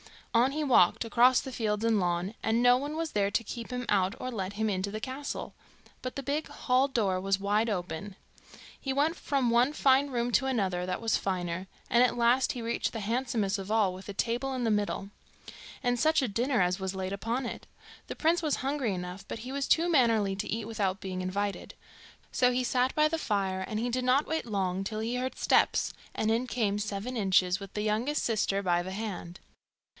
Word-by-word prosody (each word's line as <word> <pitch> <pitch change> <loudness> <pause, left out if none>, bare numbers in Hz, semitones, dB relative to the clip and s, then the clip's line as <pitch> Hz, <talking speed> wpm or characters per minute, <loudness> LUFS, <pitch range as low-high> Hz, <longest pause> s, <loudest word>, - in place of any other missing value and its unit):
On 240 +3 +4
he 305 +1 -1
walked, 245 -6 +4
across 245 +3 +5
fields 220 -5 -2
and 225 -2 +3
lawn, 175 +2 -1
and 225 +2 +1
no 245 0 +6
one 290 +3 -4
was 325 0 -2
there 200 -1 +1
to 230 - 0
keep 230 +1 -7
him 250 -1 -3
out 195 0 +2
or 255 - -4
let 195 -4 -4
him 220 +2 -1
into 195 -1 -1
the 215 +2 -5
castle; 275 +3 -5 0.5
but 255 - -5
the 275 - -4
big 290 +3 -1
hall 255 +2 +1
door 205 -8 0
was 195 +1 +1
wide 210 +3 +1
open. 185 0 -4 0.6
He 270 - -2
went 300 +5 +2
from 270 -4 0
one 245 +5 +3
fine 275 0 +3
room 245 -2 -1
to 265 - +3
another 190 -8 0
that 185 +3 -3
was 225 -1 +2
finer, 180 -1 -3 0.2
and 240 - +4
at 250 -1 +3
last 240 +2 +3
he 240 - -6
reached 230 +1 -1
the 225 - -4
handsomest 225 -3 -1
of 195 +1 -7
all, 215 -4 +2
with 185 +1 -10
a 200 - -5
table 240 +6 -1
in 255 -1 -2
the 225 - +2
middle. 205 -1 -1 0.7
And 245 0 +1
such 315 +3 +3
a 260 - 0
dinner 240 +3 +1
as 180 +2 +1
was 190 0 -3
laid 190 0 -3
upon 230 +6 -2
it! 235 - -6 0.4
The - - -5
prince 335 +2 +2
was 305 -4 +1
hungry 270 -5 -1
enough, 180 +2 -7
but - - -5
he 250 +4 -7
was 280 0 -2
too 335 +1 +3
mannerly 225 - +3
to 210 - -3
eat 225 0 -2
without 200 -4 -2
being 185 -1 -4
invited. 200 +2 -3 0.6
So 250 -1 +3
he 250 +1 +1
sat 250 +1 +1
by 305 0 +4
the 325 +1 -2
fire, 195 -6 -1
and 215 - -3
he 240 +2 -1
did 250 +1 -1
not 265 +4 +3
wait 320 -3 -2
long 195 -4 -1
till 215 +1 -3
he 235 +3 -2
heard 255 +1 -3
steps, - - +2 0.2
and 220 - +1
in 235 +3 0
came 210 -5 0
Seven 210 +4 -4
Inches 185 -3 +3
with 195 -1 -9
the 210 - -1
youngest 225 +8 0
sister 205 -3 0
by 175 -2 +2
the 185 +2 -6
hand. 190 -4 -6
225 Hz, 215 wpm, -29 LUFS, 195-255 Hz, 0.7 s, no